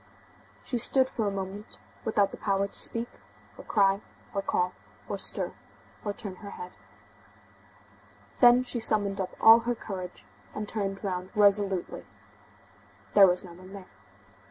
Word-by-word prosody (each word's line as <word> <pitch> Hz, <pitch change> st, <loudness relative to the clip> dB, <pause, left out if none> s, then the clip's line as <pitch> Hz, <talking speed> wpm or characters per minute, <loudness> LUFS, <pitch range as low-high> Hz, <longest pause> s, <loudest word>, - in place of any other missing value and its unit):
She 245 Hz, -, -3 dB
stood 260 Hz, +3 st, +3 dB
for 220 Hz, -3 st, -1 dB
a -, -, 0 dB
moment 195 Hz, +1 st, -6 dB, 0.3 s
without 205 Hz, -3 st, +2 dB
the -, -, -7 dB
power 195 Hz, -1 st, 0 dB
to -, -, -6 dB
speak, 230 Hz, +1 st, 0 dB, 0.5 s
or -, -, -11 dB
cry, 195 Hz, -1 st, +2 dB, 0.3 s
or 200 Hz, -, -1 dB
call, 180 Hz, -2 st, 0 dB, 0.3 s
or -, -, -4 dB
stir, -, -, -1 dB, 0.5 s
or 205 Hz, -, -2 dB
turn 200 Hz, -2 st, -6 dB
her 200 Hz, -, -9 dB
head. 180 Hz, -2 st, -8 dB, 1.7 s
Then 245 Hz, +1 st, +7 dB
she 245 Hz, -1 st, -3 dB
summoned 205 Hz, -3 st, +2 dB
up 185 Hz, -, -5 dB
all 225 Hz, +1 st, +9 dB
her 240 Hz, +1 st, -2 dB
courage, 185 Hz, -5 st, -7 dB, 0.3 s
and 210 Hz, 0 st, -4 dB
turned 195 Hz, -2 st, -3 dB
round 185 Hz, -2 st, -3 dB
resolutely. 200 Hz, -3 st, +2 dB, 1.1 s
There 200 Hz, -2 st, +8 dB
was 180 Hz, +1 st, +2 dB
no 175 Hz, -, -11 dB
one 185 Hz, +2 st, -13 dB
there. 195 Hz, -2 st, -10 dB
200 Hz, 150 wpm, -28 LUFS, 190-215 Hz, 1.7 s, all